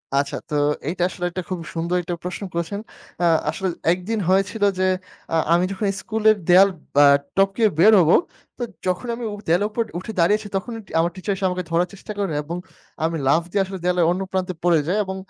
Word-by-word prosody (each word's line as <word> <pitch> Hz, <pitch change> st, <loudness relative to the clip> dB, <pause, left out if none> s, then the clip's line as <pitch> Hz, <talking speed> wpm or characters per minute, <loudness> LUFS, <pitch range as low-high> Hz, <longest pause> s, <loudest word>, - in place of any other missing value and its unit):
আচ্ছা, 140 Hz, 0 st, 0 dB
তো 150 Hz, -, -2 dB, 0.3 s
এইটা 175 Hz, +1 st, -1 dB
আসলে 175 Hz, -, -5 dB
একটা 185 Hz, -, -4 dB
খুবই 170 Hz, -3 st, -4 dB
সুন্দর 170 Hz, +2 st, -1 dB
একটা 175 Hz, +1 st, -3 dB
প্রশ্ন 180 Hz, +3 st, -5 dB
করেছেন। 170 Hz, +4 st, -3 dB, 0.4 s
আ -, -, +3 dB, 0.2 s
আসলে 190 Hz, -, -2 dB, 0.3 s
একদিন 200 Hz, +5 st, -3 dB
হয়েছিল 195 Hz, +3 st, +1 dB, 0.2 s
যে, -, -, +2 dB, 0.5 s
আ -, -, +3 dB, 0.2 s
আমি 175 Hz, -, +3 dB
যখন 200 Hz, +1 st, -2 dB
স্কুলের 220 Hz, -1 st, +3 dB
দেয়াল 190 Hz, +3 st, +7 dB, 0.3 s
ব্যা 145 Hz, -, +7 dB, 0.3 s
টপকে 195 Hz, +3 st, +2 dB, 0.2 s
বের 215 Hz, +5 st, +7 dB
হবো, 165 Hz, -1 st, +5 dB, 0.4 s
তো 245 Hz, -, -3 dB, 0.2 s
যখন 180 Hz, +6 st, -1 dB
আমি 240 Hz, -, -7 dB
উ -, -, -4 dB
দেয়ালের 180 Hz, +6 st, +3 dB
উপর 230 Hz, +2 st, 0 dB, 0.2 s
উঠে 205 Hz, -, -7 dB
দাঁড়িয়েছি, 205 Hz, +5 st, +2 dB
তখনই 225 Hz, +4 st, -3 dB, 0.2 s
আমার 170 Hz, +1 st, +2 dB
টিচার 195 Hz, +2 st, -2 dB
এসে 190 Hz, -, -3 dB
আমাকে 180 Hz, 0 st, -3 dB
ধরার 175 Hz, +2 st, +2 dB
চেষ্টা 200 Hz, +2 st, -9 dB
করেন 195 Hz, -5 st, -1 dB
এবং 170 Hz, +4 st, -5 dB, 0.5 s
আমি 165 Hz, +1 st, 0 dB
লাফ 155 Hz, +5 st, +4 dB
দিয়ে 200 Hz, -, +2 dB
আসলে 190 Hz, 0 st, -6 dB
দেয়ালের 180 Hz, -1 st, +2 dB
অন্য 185 Hz, +2 st, -1 dB
প্রান্তে 185 Hz, -1 st, -1 dB
পড়ে 170 Hz, -3 st, +4 dB
যাই 185 Hz, -, +1 dB
এবং 190 Hz, 0 st, -4 dB
185 Hz, 200 wpm, -22 LUFS, 175-200 Hz, 0.5 s, দেয়াল